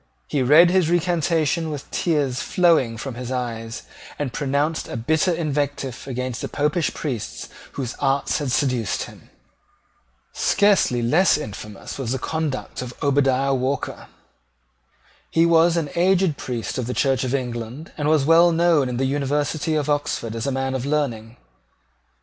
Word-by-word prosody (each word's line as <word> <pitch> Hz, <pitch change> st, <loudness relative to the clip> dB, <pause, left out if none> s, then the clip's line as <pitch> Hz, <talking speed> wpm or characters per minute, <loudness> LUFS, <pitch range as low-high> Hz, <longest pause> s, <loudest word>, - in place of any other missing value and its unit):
He 145 Hz, -, -1 dB
read 155 Hz, +7 st, +6 dB
his 185 Hz, -3 st, +3 dB
recantation 170 Hz, -2 st, +1 dB
with 145 Hz, -2 st, -7 dB
tears 145 Hz, -6 st, 0 dB
flowing 165 Hz, -11 st, +2 dB
from 135 Hz, +3 st, -5 dB
his 125 Hz, +1 st, -6 dB
eyes, 115 Hz, -3 st, -4 dB, 0.3 s
and 140 Hz, -4 st, -3 dB
pronounced 145 Hz, +1 st, -1 dB
a -, -, -5 dB
bitter 160 Hz, +9 st, +1 dB
invective 145 Hz, -6 st, -2 dB
against 125 Hz, -2 st, -4 dB
the -, -, -3 dB
Popish 150 Hz, +2 st, 0 dB
priests 125 Hz, -8 st, -4 dB, 0.3 s
whose 130 Hz, -3 st, -4 dB
arts 135 Hz, 0 st, +1 dB
had 145 Hz, -4 st, -2 dB
seduced 125 Hz, -6 st, 0 dB
him. -, -, -13 dB, 1.0 s
Scarcely 195 Hz, -, +2 dB
less 160 Hz, +11 st, +4 dB
infamous 105 Hz, -3 st, -8 dB
was 125 Hz, -2 st, -2 dB
the -, -, -1 dB
conduct 155 Hz, -1 st, -3 dB
of 125 Hz, -1 st, -7 dB
Obadiah 135 Hz, -1 st, +2 dB
Walker. 130 Hz, +1 st, -2 dB, 1.2 s
He 165 Hz, +1 st, +3 dB
was 170 Hz, 0 st, +4 dB
an 155 Hz, -4 st, -2 dB
aged 185 Hz, -2 st, +3 dB
priest 125 Hz, -2 st, -4 dB
of 120 Hz, -, -3 dB
the 125 Hz, -, -3 dB
Church 135 Hz, -2 st, +1 dB
of 130 Hz, +1 st, 0 dB
England, 125 Hz, +3 st, -5 dB
and 150 Hz, -1 st, -2 dB
was 155 Hz, -3 st, +3 dB
well 165 Hz, +2 st, +6 dB
known 165 Hz, -5 st, +3 dB
in 125 Hz, -, -3 dB
the 135 Hz, -, +1 dB
University 145 Hz, +3 st, -1 dB
of 150 Hz, -2 st, 0 dB
Oxford 145 Hz, -6 st, -1 dB
as 115 Hz, +3 st, -3 dB
a -, -, +1 dB
man 135 Hz, 0 st, -1 dB
of 130 Hz, -2 st, -2 dB
learning. 125 Hz, -6 st, -2 dB
140 Hz, 155 wpm, -22 LUFS, 125-160 Hz, 1.2 s, read